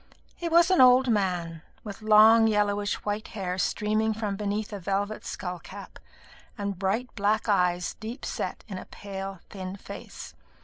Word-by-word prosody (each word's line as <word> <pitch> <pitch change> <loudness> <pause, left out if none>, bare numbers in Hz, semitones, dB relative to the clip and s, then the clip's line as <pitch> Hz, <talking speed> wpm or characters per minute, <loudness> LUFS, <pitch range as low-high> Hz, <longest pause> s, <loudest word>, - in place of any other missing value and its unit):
He 340 - -4
was 340 +2 +5
an 370 - +5
old 255 0 +6
man, 180 -6 -1 0.2
with 205 -1 -8
long 220 +1 +7
yellowish 205 -1 +1
white 210 +1 -2
hair 185 -1 -3
streaming 215 +3 0
from 210 -2 -2
beneath 210 +1 -3
a 205 - -4
velvet 200 +3 -2
skull 180 -1 -5
cap, 195 +3 -11 0.6
and 200 -3 -4
bright 210 +6 -1
black 210 +2 0
eyes 180 -4 +1
deep 225 +4 -7
set - - -4
in 190 -4 -6
a - - -10
pale 195 -2 -7
thin 190 -2 -6
face. 200 - -9
205 Hz, 160 wpm, -27 LUFS, 195-220 Hz, 0.6 s, long